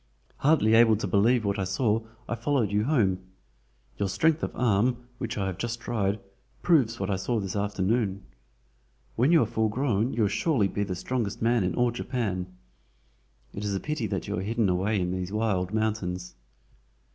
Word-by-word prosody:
Hardly 135 Hz, -7 st, +3 dB
able 115 Hz, -1 st, +6 dB
to 105 Hz, -, -3 dB
believe 115 Hz, +3 st, +3 dB
what 100 Hz, +1 st, 0 dB
I -, -, +1 dB
saw 105 Hz, +3 st, +1 dB, 0.3 s
I -, -, -2 dB
followed 115 Hz, -2 st, 0 dB
you 105 Hz, +1 st, +1 dB
home. 105 Hz, -11 st, +2 dB, 0.8 s
Your 100 Hz, -2 st, 0 dB
strength 155 Hz, -, +2 dB
of -, -, -1 dB
arm, 120 Hz, +1 st, +2 dB, 0.2 s
which 115 Hz, -2 st, -4 dB
I 100 Hz, -, -1 dB
have 95 Hz, -1 st, -4 dB
just 120 Hz, 0 st, -3 dB
tried, 110 Hz, -4 st, -1 dB, 0.4 s
proves 130 Hz, -10 st, +3 dB
what 95 Hz, 0 st, -1 dB
I 95 Hz, -, 0 dB
saw 110 Hz, +5 st, -1 dB
this 100 Hz, 0 st, -4 dB
afternoon. 100 Hz, 0 st, 0 dB, 0.9 s
When 130 Hz, +7 st, +3 dB
you 165 Hz, -3 st, +6 dB
are -, -, 0 dB
full 110 Hz, 0 st, 0 dB
grown 120 Hz, -1 st, 0 dB
you 115 Hz, -, 0 dB
will -, -, +4 dB
surely 150 Hz, -, +1 dB
be 100 Hz, +1 st, -2 dB
the 95 Hz, -2 st, -3 dB
strongest 115 Hz, +2 st, -3 dB
man 115 Hz, -2 st, +2 dB
in 90 Hz, -2 st, -1 dB
all 120 Hz, -1 st, +2 dB
Japan. 110 Hz, -7 st, -3 dB, 1.1 s
It 100 Hz, -, -5 dB
is 100 Hz, -1 st, -1 dB
a -, -, -1 dB
pity 150 Hz, -4 st, -2 dB
that -, -, -3 dB
you -, -, -2 dB
are -, -, -3 dB
hidden 110 Hz, +1 st, 0 dB
away 95 Hz, +4 st, +1 dB
in 90 Hz, -1 st, -1 dB
these 90 Hz, 0 st, -3 dB
wild 105 Hz, -4 st, 0 dB
mountains." 100 Hz, -5 st, -2 dB
110 Hz, 190 wpm, -27 LUFS, 95-120 Hz, 1.1 s, able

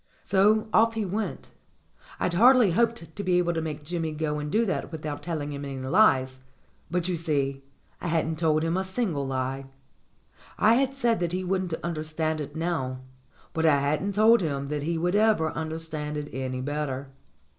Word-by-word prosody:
So 210 Hz, +3 st, +3 dB
off 225 Hz, +1 st, +4 dB
he 220 Hz, -2 st, -1 dB
went. 205 Hz, +3 st, -4 dB, 0.7 s
I'd 180 Hz, -, 0 dB
hardly 240 Hz, +1 st, +6 dB
hoped 200 Hz, -5 st, 0 dB
to 200 Hz, -, -4 dB
be 180 Hz, -2 st, +2 dB
able 175 Hz, -1 st, +1 dB
to 165 Hz, -, -1 dB
make 155 Hz, -2 st, -5 dB
Jimmy 165 Hz, 0 st, -3 dB
go 150 Hz, -1 st, -2 dB
and 150 Hz, 0 st, -4 dB
do 225 Hz, +5 st, +2 dB
that 190 Hz, -, -2 dB
without 155 Hz, -2 st, -5 dB
telling 150 Hz, -4 st, -4 dB
him 140 Hz, 0 st, -6 dB
any 140 Hz, -1 st, -5 dB
lies; 130 Hz, -2 st, +3 dB, 0.5 s
but, 180 Hz, +1 st, -1 dB
you 180 Hz, -, 0 dB
see, 140 Hz, -4 st, -1 dB, 0.4 s
I -, -, -3 dB
hadn't 160 Hz, -1 st, 0 dB
told 155 Hz, -2 st, +2 dB
him 165 Hz, +2 st, 0 dB
a 190 Hz, -, 0 dB
single 190 Hz, -, -2 dB
lie. 135 Hz, +1 st, -2 dB, 0.9 s
I 220 Hz, +2 st, +5 dB
had 270 Hz, +2 st, +1 dB
said 240 Hz, -4 st, +1 dB
that 175 Hz, -1 st, -1 dB
he 185 Hz, +1 st, -1 dB
wouldn't 185 Hz, -2 st, -1 dB
understand 155 Hz, -1 st, -2 dB
it 145 Hz, +1 st, -7 dB
now, 160 Hz, -6 st, -2 dB, 0.5 s
but 160 Hz, 0 st, +2 dB
I 145 Hz, -3 st, +5 dB
hadn't 150 Hz, +8 st, 0 dB
told 220 Hz, +1 st, +6 dB
him 140 Hz, -4 st, -2 dB
that 150 Hz, -1 st, -2 dB
he 165 Hz, +3 st, -1 dB
would 175 Hz, +3 st, 0 dB
ever 210 Hz, -7 st, +3 dB
understand 155 Hz, -2 st, -4 dB
it 150 Hz, 0 st, -5 dB
any 130 Hz, -1 st, -3 dB
better. 140 Hz, -1 st, -3 dB
160 Hz, 185 wpm, -26 LUFS, 145-190 Hz, 0.9 s, hardly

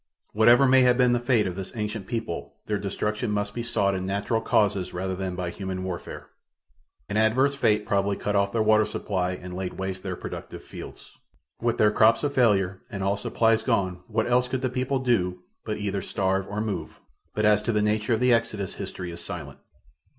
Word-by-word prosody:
Whatever 120 Hz, +5 st, +6 dB
may 130 Hz, 0 st, +6 dB
have 125 Hz, -1 st, +4 dB
been 125 Hz, -1 st, +4 dB
the 120 Hz, -, +2 dB
fate 120 Hz, -3 st, +2 dB
of 90 Hz, -, -3 dB
this 95 Hz, 0 st, -6 dB
ancient 105 Hz, -2 st, -4 dB
people 85 Hz, -11 st, -4 dB
their 105 Hz, -1 st, -1 dB
destruction 105 Hz, +3 st, -2 dB
must 105 Hz, 0 st, -1 dB
be 120 Hz, -, -3 dB
sought 100 Hz, -4 st, +1 dB
in 95 Hz, -1 st, -2 dB
natural 100 Hz, +4 st, -1 dB
causes 100 Hz, -5 st, +1 dB
rather 95 Hz, +1 st, -2 dB
than 95 Hz, -1 st, -3 dB
by 90 Hz, -1 st, -3 dB
human 95 Hz, -1 st, -5 dB
warfare. 90 Hz, -2 st, -6 dB, 0.8 s
An 105 Hz, -, -2 dB
adverse 125 Hz, +6 st, +3 dB
fate 105 Hz, -6 st, +2 dB
probably 100 Hz, 0 st, +1 dB
cut 105 Hz, -, -2 dB
off 100 Hz, 0 st, +2 dB
their 110 Hz, 0 st, +1 dB
water 110 Hz, 0 st, +5 dB
supply 95 Hz, -4 st, -2 dB
and 90 Hz, 0 st, -8 dB
laid 95 Hz, -1 st, -4 dB
waste 95 Hz, 0 st, -4 dB
their 95 Hz, -1 st, -4 dB
productive -, -, -8 dB
fields. -, -, -11 dB, 0.4 s
With 120 Hz, 0 st, +1 dB
their 105 Hz, -1 st, +4 dB
crops 110 Hz, +4 st, +4 dB
a 145 Hz, -, +1 dB
failure 100 Hz, -8 st, +2 dB
and 100 Hz, -3 st, -4 dB
all 100 Hz, +1 st, +1 dB
supplies 115 Hz, +2 st, +2 dB
gone 90 Hz, -4 st, 0 dB
what 110 Hz, -1 st, 0 dB
else 125 Hz, +1 st, +2 dB
could 130 Hz, 0 st, -2 dB
the 130 Hz, -, +1 dB
people 130 Hz, +2 st, -1 dB
do 90 Hz, -9 st, 0 dB, 0.2 s
but 105 Hz, -1 st, -3 dB
either 100 Hz, -1 st, -2 dB
starve 95 Hz, 0 st, -1 dB
or 105 Hz, +1 st, -2 dB
move, 95 Hz, -8 st, -4 dB, 0.4 s
but 105 Hz, -, +1 dB
as 105 Hz, -1 st, +5 dB
to 115 Hz, -, -1 dB
the 105 Hz, -2 st, +1 dB
nature 105 Hz, +2 st, +1 dB
of -, -, -3 dB
the 125 Hz, 0 st, +4 dB
exodus 110 Hz, -4 st, -1 dB
history 90 Hz, -1 st, -6 dB
is 85 Hz, -, -8 dB
silent. 75 Hz, -7 st, -7 dB
105 Hz, 205 wpm, -26 LUFS, 95-115 Hz, 0.8 s, Whatever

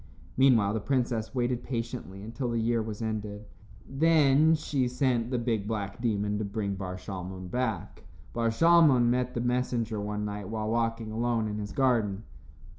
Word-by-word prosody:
Meanwhile, 120 Hz, -6 st, +4 dB
the 110 Hz, -, 0 dB
princess 120 Hz, -1 st, -1 dB
waited 125 Hz, -1 st, 0 dB
patiently 115 Hz, -5 st, -5 dB
until 120 Hz, +3 st, -4 dB
the 115 Hz, -1 st, 0 dB
year 115 Hz, 0 st, +1 dB
was 110 Hz, 0 st, -5 dB
ended. 105 Hz, -1 st, -4 dB, 0.4 s
Then 155 Hz, +1 st, +4 dB
she 140 Hz, -4 st, -1 dB
sent 125 Hz, -2 st, 0 dB
the 125 Hz, -, 0 dB
big, 115 Hz, -4 st, -1 dB
black 105 Hz, -1 st, -4 dB
demon 105 Hz, -3 st, 0 dB
to -, -, -1 dB
bring 100 Hz, 0 st, -2 dB
Bar 95 Hz, -1 st, -5 dB
Shalmon 95 Hz, -1 st, -7 dB
back. 125 Hz, -3 st, -3 dB, 0.3 s
Bar 115 Hz, -1 st, +1 dB
Shalmon 150 Hz, -3 st, +5 dB
met 125 Hz, 0 st, -1 dB
the 120 Hz, -, -1 dB
messenger 120 Hz, -3 st, -1 dB
one 105 Hz, 0 st, -3 dB
night 105 Hz, -1 st, -5 dB
when 110 Hz, -1 st, -3 dB
walking 115 Hz, -1 st, -1 dB
alone 115 Hz, 0 st, 0 dB
in 105 Hz, 0 st, -4 dB
his 105 Hz, 0 st, -5 dB
garden. 115 Hz, -7 st, +1 dB
115 Hz, 165 wpm, -28 LUFS, 105-125 Hz, 0.4 s, Shalmon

